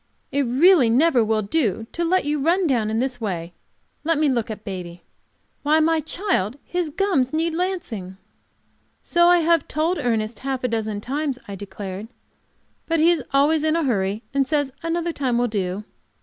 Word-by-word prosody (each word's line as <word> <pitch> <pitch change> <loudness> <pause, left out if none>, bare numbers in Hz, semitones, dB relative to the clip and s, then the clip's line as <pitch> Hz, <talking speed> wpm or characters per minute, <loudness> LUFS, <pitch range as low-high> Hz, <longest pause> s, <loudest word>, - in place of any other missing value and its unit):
"It 285 - +1
really 280 +1 +5
never 255 0 +4
will 215 0 0
do 225 - 0
to 340 - -2
let 365 +1 +2
you 295 0 0
run 345 +6 +2
down 240 -8 +1
in 220 - -1
this 250 0 -1
way. 175 -5 -4 0.5
Let 330 0 +1
me 300 -1 +3
look 235 -4 -1
at 215 -1 -6
baby. 175 -3 -7 0.6
Why, 305 +2 +3
my 325 +1 +3
child, 305 - -1
his 355 -3 -2
gums 295 -7 +1
need 325 +1 0
lancing." 320 - -3 0.9
"So 345 0 +3
I 350 -1 +5
have 330 -2 +2
told 325 +4 0
Ernest 225 -2 -1
half 265 -1 -3
a - - +2
dozen 220 -3 -2
times," 280 +2 -2
I 200 - -6
declared. 195 +1 -7 0.8
"But 330 -1 +1
he 330 +3 +5
is 340 - 0
always 295 +3 +3
in 315 0 +2
a 335 - +1
hurry, 210 -4 -1
and 275 -1 +1
says 290 -3 0
another 335 0 -1
time 255 -5 0
will 245 0 +2
do." 200 -2 -3
270 Hz, 180 wpm, -22 LUFS, 215-325 Hz, 0.9 s, really